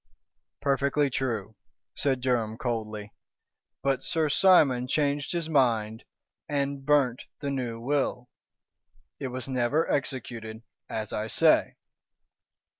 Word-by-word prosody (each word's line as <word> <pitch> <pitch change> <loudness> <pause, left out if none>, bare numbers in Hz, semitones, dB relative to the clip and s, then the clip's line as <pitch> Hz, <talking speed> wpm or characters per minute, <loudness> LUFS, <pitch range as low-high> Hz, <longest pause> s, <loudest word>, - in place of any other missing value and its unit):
"Perfectly 140 +1 +1
true," 110 -5 -2 0.4
said 135 -3 0
Durham, 115 -4 0
coldly. 110 -4 -4 0.7
"But 135 -1 +1
Sir 160 -2 0
Simon 145 -8 +5
changed 145 +1 0
his 170 -3 -1
mind 115 -7 +1 0.4
and 140 -1 -1
burnt 135 -4 +2
the 140 -2 -3
new 125 -4 -3
will. 125 -1 -1 0.9
It 135 - -3
was 130 -1 -6
never 130 +4 +1
executed, 115 -5 -3 0.3
as 110 -1 -4
I 105 +1 -2
say." - - +3
130 Hz, 110 wpm, -27 LUFS, 115-140 Hz, 0.9 s, Simon